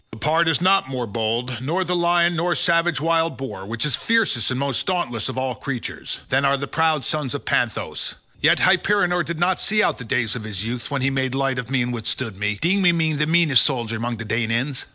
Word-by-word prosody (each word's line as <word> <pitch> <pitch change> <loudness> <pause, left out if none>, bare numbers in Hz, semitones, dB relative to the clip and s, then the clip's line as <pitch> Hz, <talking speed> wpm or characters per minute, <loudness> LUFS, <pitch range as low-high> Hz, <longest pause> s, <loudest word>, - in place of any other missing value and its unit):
The 110 - -10
pard 160 +7 +2
is 165 0 +2
not 190 -6 +3
more 130 -2 -3
bold, 115 +2 -2
nor 165 +8 0
the 180 0 -1
lion 175 0 +2
nor 175 +1 0
savage 170 -2 +2
wild 165 +1 +1
boar, 100 -8 -7
which 115 +5 -2
is 145 -4 +1
fiercest 225 - +1
and 130 0 -2
most 140 -2 -1
dauntless 150 -12 -1
of - - -6
all 130 -1 -1
creatures, 125 +1 -6
than 135 +2 +2
are 140 0 +3
the 140 - -4
proud 160 -2 +1
sons 150 -5 -2
of - - -6
Panthous. - - -1 0.3
Yet - - +5
Hyperenor 180 -4 +3
did 170 -1 -4
not 180 +1 +1
see 210 0 +2
out - - 0
the - - -6
days 115 0 -1
of 120 - -6
his 105 -1 -4
youth 120 +1 -4
when 140 -3 -2
he 135 - +2
made 130 -1 -1
light 135 -1 0
of 125 -1 -6
me 130 -2 +1
and 120 0 -3
withstood 115 -1 -2
me, 105 +1 -2
deeming 180 0 +3
me 160 -1 +1
the 150 +1 0
meanest 160 -6 +4
soldier 120 -5 -1
among 115 +1 -3
the 115 - -6
Danaans. 115 +5 -1
135 Hz, 230 wpm, -22 LUFS, 120-170 Hz, 0.3 s, Yet